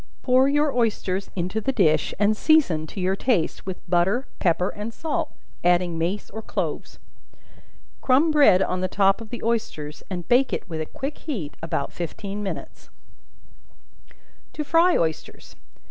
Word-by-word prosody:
Pour 255 Hz, +1 st, +4 dB
your 295 Hz, 0 st, +2 dB
oysters 205 Hz, -5 st, 0 dB
into 185 Hz, +4 st, -2 dB
the 270 Hz, -, 0 dB
dish, 155 Hz, -, +2 dB
and 210 Hz, +1 st, +3 dB
season, 215 Hz, -, +3 dB
to 195 Hz, -, -8 dB
your 185 Hz, +1 st, +1 dB
taste, 195 Hz, -6 st, 0 dB
with 190 Hz, 0 st, -6 dB
butter, 185 Hz, +9 st, +2 dB
pepper 180 Hz, +1 st, +2 dB
and 210 Hz, +2 st, -6 dB
salt, 315 Hz, +6 st, -3 dB, 0.3 s
adding 175 Hz, -1 st, +2 dB
mace 175 Hz, +5 st, -2 dB
or 220 Hz, -, -6 dB
cloves. -, -, -4 dB, 1.0 s
Crumb 280 Hz, +5 st, +4 dB
bread 285 Hz, -11 st, +6 dB
on 185 Hz, 0 st, -2 dB
the 185 Hz, -, +1 dB
top 195 Hz, +2 st, +2 dB
of 225 Hz, -, -9 dB
the 240 Hz, -, -7 dB
oysters, 215 Hz, -10 st, -2 dB
and 175 Hz, -3 st, -5 dB
bake 255 Hz, +2 st, +3 dB
it -, -, -3 dB
with 160 Hz, -3 st, -4 dB
a 155 Hz, -, -4 dB
quick 275 Hz, +3 st, -6 dB
heat 205 Hz, -, -5 dB
about 155 Hz, -3 st, -3 dB
fifteen 195 Hz, +4 st, -5 dB
minutes. 200 Hz, -, -7 dB, 1.6 s
To 300 Hz, -, -3 dB
Fry 335 Hz, +4 st, +4 dB
Oysters. 160 Hz, -1 st, -3 dB
200 Hz, 155 wpm, -24 LUFS, 175-255 Hz, 1.6 s, bread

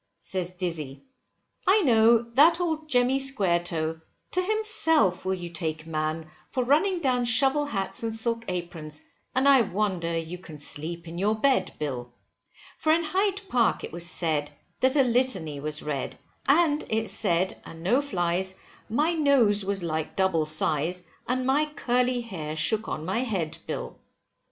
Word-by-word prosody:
Says 185 Hz, -2 st, -3 dB
Dizzy, 165 Hz, -7 st, -5 dB, 0.6 s
I 400 Hz, +2 st, +5 dB
know, 230 Hz, -3 st, +5 dB
that 315 Hz, +7 st, +5 dB
old 315 Hz, -3 st, -2 dB
Jemmy 250 Hz, 0 st, +3 dB
Squaretoe, 175 Hz, -, 0 dB, 0.3 s
to 365 Hz, -, +1 dB
himself 360 Hz, -, +2 dB
will 190 Hz, 0 st, 0 dB
you 175 Hz, -2 st, -7 dB
take 160 Hz, -1 st, -4 dB
man, 155 Hz, 0 st, -3 dB, 0.2 s
for 255 Hz, -, -2 dB
running 335 Hz, +8 st, +2 dB
down 255 Hz, -4 st, +1 dB
shovel 270 Hz, +5 st, +4 dB
hats 200 Hz, -2 st, -2 dB
and 225 Hz, -1 st, -3 dB
silk 230 Hz, 0 st, -1 dB
aprons, 170 Hz, -4 st, -6 dB, 0.3 s
and 260 Hz, +2 st, +3 dB
I 275 Hz, -2 st, +7 dB
wonder 190 Hz, -5 st, -1 dB
you 165 Hz, +2 st, -5 dB
can 160 Hz, -4 st, -11 dB
sleep 165 Hz, +3 st, -4 dB
in 170 Hz, +1 st, -7 dB
your 210 Hz, +3 st, +1 dB
bed, 220 Hz, -5 st, +1 dB
Bill, 125 Hz, -5 st, -4 dB, 0.7 s
For 310 Hz, -, +2 dB
in 330 Hz, +1 st, +3 dB
Hyde 390 Hz, +5 st, 0 dB
Park 240 Hz, -7 st, +1 dB
it -, -, -6 dB
was 170 Hz, +1 st, -1 dB
said, 155 Hz, -5 st, -1 dB, 0.3 s
that 260 Hz, +2 st, +2 dB
a 280 Hz, -, +5 dB
litany 240 Hz, -, 0 dB
was 150 Hz, +1 st, -4 dB
read, 145 Hz, -3 st, -4 dB, 0.3 s
and 300 Hz, 0 st, +3 dB
it 220 Hz, 0 st, 0 dB
said, 185 Hz, -2 st, 0 dB
and 165 Hz, 0 st, -11 dB
no 245 Hz, +10 st, +3 dB
flies, 185 Hz, -6 st, -1 dB, 0.3 s
my 300 Hz, +9 st, +1 dB
nose 265 Hz, -10 st, +3 dB
was 195 Hz, -1 st, -1 dB
like 160 Hz, -2 st, -3 dB
double 190 Hz, -5 st, +1 dB
size, 155 Hz, +3 st, +3 dB, 0.2 s
and 255 Hz, +1 st, -1 dB
my 280 Hz, +4 st, +2 dB
curly 250 Hz, -1 st, +1 dB
hair 165 Hz, -10 st, -6 dB
shook 210 Hz, +8 st, +2 dB
on 155 Hz, -, -4 dB
my 190 Hz, +6 st, -1 dB
head, 195 Hz, -11 st, -2 dB
Bill. -, -, -5 dB
200 Hz, 160 wpm, -26 LUFS, 165-265 Hz, 0.7 s, I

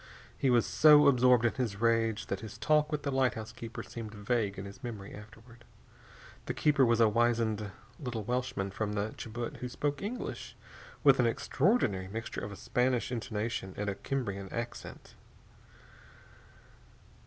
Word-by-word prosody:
He 135 Hz, -, +1 dB
was 120 Hz, -2 st, +4 dB
so 150 Hz, -1 st, +7 dB
absorbed 125 Hz, -3 st, +5 dB
in 120 Hz, -, +2 dB
his 115 Hz, -6 st, -3 dB
rage 115 Hz, -1 st, +1 dB
that 95 Hz, -, -3 dB
his 110 Hz, -1 st, -9 dB
talk 150 Hz, 0 st, +2 dB
with 150 Hz, -1 st, -2 dB
the 140 Hz, -, -1 dB
lighthouse 120 Hz, -5 st, 0 dB
keeper 115 Hz, 0 st, -7 dB
seemed 110 Hz, -2 st, -8 dB
vague 105 Hz, -1 st, -1 dB
in 95 Hz, -, -6 dB
his 100 Hz, +7 st, -11 dB
memory, 105 Hz, -5 st, -6 dB
afterward. 110 Hz, +3 st, -13 dB, 0.8 s
The -, -, -2 dB
keeper 145 Hz, -2 st, +3 dB
was 115 Hz, -2 st, +3 dB
a 115 Hz, -, +6 dB
wizened 110 Hz, -2 st, +1 dB, 0.3 s
little 120 Hz, -6 st, -4 dB
Welshman 120 Hz, -4 st, -2 dB
from 105 Hz, +1 st, -3 dB
the 105 Hz, +1 st, -2 dB
Chibut 120 Hz, +1 st, -5 dB
who 125 Hz, -, -5 dB
spoke 145 Hz, +3 st, -2 dB
English 230 Hz, +5 st, -5 dB, 0.5 s
with 135 Hz, -3 st, +6 dB
an 120 Hz, -, +4 dB
extraordinary 120 Hz, -, +1 dB
mixture 110 Hz, +3 st, -5 dB
of 100 Hz, -, -5 dB
a -, -, -7 dB
Spanish 125 Hz, +2 st, 0 dB
intonation 110 Hz, -4 st, -3 dB
and 105 Hz, 0 st, -1 dB
a -, -, -3 dB
Cimbrian 100 Hz, -8 st, -3 dB
accent. 120 Hz, +1 st, -6 dB
115 Hz, 155 wpm, -31 LUFS, 105-125 Hz, 0.8 s, so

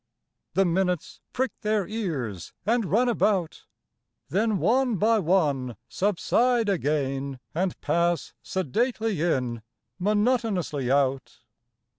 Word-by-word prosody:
The 195 Hz, +1 st, +4 dB
minutes 180 Hz, -1 st, -1 dB
prick 260 Hz, +1 st, -1 dB
their 210 Hz, -3 st, 0 dB
ears 145 Hz, -, -4 dB
and 230 Hz, +1 st, +2 dB
run 220 Hz, +9 st, +2 dB
about, 205 Hz, -7 st, 0 dB, 0.6 s
Then 215 Hz, +3 st, +1 dB
one 235 Hz, -, +2 dB
by 220 Hz, +3 st, +3 dB
one 150 Hz, -, +1 dB
subside 225 Hz, +4 st, +1 dB
again 140 Hz, -6 st, -1 dB
and 180 Hz, +2 st, -1 dB
pass 170 Hz, 0 st, 0 dB
Sedately 215 Hz, -, -1 dB
in, 125 Hz, -9 st, 0 dB, 0.4 s
monotonously 205 Hz, -, +1 dB
out. 135 Hz, -3 st, 0 dB
185 Hz, 100 wpm, -26 LUFS, 145-220 Hz, 0.6 s, The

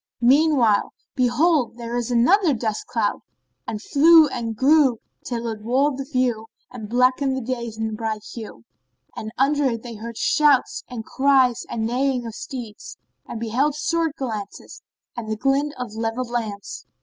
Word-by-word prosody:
Meanwhile 260 Hz, -5 st, +3 dB, 0.2 s
behold, 255 Hz, +1 st, +2 dB
there 235 Hz, -1 st, -6 dB
arose 240 Hz, -1 st, -2 dB
another 300 Hz, -, +3 dB
dust 220 Hz, -2 st, -3 dB
cloud -, -, -1 dB, 0.5 s
and 215 Hz, -, -4 dB
flew 315 Hz, +7 st, +6 dB
and 230 Hz, -3 st, -4 dB
grew 270 Hz, 0 st, +4 dB, 0.3 s
till 235 Hz, -1 st, -4 dB
it 220 Hz, -2 st, -5 dB
walled 265 Hz, +5 st, +1 dB
the 270 Hz, -, -4 dB
view 245 Hz, -4 st, 0 dB, 0.2 s
and 220 Hz, -4 st, -8 dB
blackened 255 Hz, +3 st, +2 dB
the 255 Hz, 0 st, -2 dB
day's 235 Hz, -3 st, -6 dB, 0.2 s
bright 215 Hz, -1 st, -4 dB
hue; 215 Hz, -, -9 dB, 0.5 s
and 220 Hz, -, -6 dB
under 285 Hz, +2 st, +2 dB
it 230 Hz, -4 st, -1 dB
they 240 Hz, -2 st, -7 dB
heard 230 Hz, +1 st, -8 dB
shouts 295 Hz, -4 st, +2 dB
and 230 Hz, -3 st, -6 dB
cries 265 Hz, -3 st, +2 dB
and 220 Hz, -1 st, -2 dB
neighing 250 Hz, +1 st, 0 dB
of 225 Hz, -, -6 dB
steeds 235 Hz, -4 st, -8 dB, 0.3 s
and 225 Hz, -, -6 dB
beheld 255 Hz, +6 st, 0 dB
sword 330 Hz, 0 st, 0 dB
glance 215 Hz, -6 st, -6 dB, 0.3 s
and 230 Hz, -2 st, -6 dB
the 220 Hz, -, -2 dB
glint 275 Hz, +4 st, +1 dB
of 250 Hz, -4 st, -6 dB
levelled 225 Hz, +2 st, -3 dB
lance. 210 Hz, -, -5 dB
245 Hz, 155 wpm, -22 LUFS, 225-275 Hz, 0.5 s, flew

